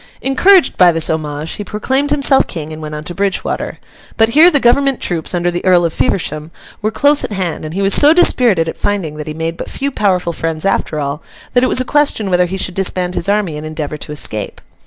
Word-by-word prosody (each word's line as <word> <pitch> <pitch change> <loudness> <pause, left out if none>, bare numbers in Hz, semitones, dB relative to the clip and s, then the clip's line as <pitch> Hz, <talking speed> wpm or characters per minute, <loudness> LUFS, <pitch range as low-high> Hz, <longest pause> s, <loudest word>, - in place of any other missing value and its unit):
Encouraged 355 +8 +3
by 180 -2 +6
this 165 -1 0
homage, 155 0 -4
he 205 - -5
proclaimed 260 +8 -1
himself 280 -2 +3
King, 160 -3 -6
and 155 - -9
went 150 0 -6
on 150 - -6
to 175 - -6
Bridgewater. 195 +1 -3 0.4
But, 225 0 +4
here 310 +8 +6
the 290 - +2
Government 270 +2 +2
troops, 170 0 -2
under 175 0 0
the 175 - -4
Earl 180 -2 +4
of 165 - -2
Feversham, 155 +3 -2 0.3
were 215 - 0
close 285 +6 +2
at - - -4
hand; 180 -6 -3
and 155 +2 -7
he 195 - -1
was 195 0 +2
so 295 +1 +6
dispirited 245 - +3
at - - -5
finding 190 -7 -2
that 150 - -7
he 155 - -5
made 165 +1 -4
but - - -6
few 280 +1 -3
powerful 185 -7 0
friends 165 +1 -3
after 180 -5 -1
all, 145 +2 -3 0.3
that 245 - +3
it - - +3
was 255 - +2
a - - -3
question 265 -9 0
whether 180 0 +2
he 190 +2 -5
should 185 -1 -3
disband 180 -1 -1
his 180 - -3
army 200 -7 0
and 150 - -7
endeavour 155 -1 -5
to 150 - -9
escape. 110 -8 -3
180 Hz, 235 wpm, -15 LUFS, 160-235 Hz, 0.4 s, by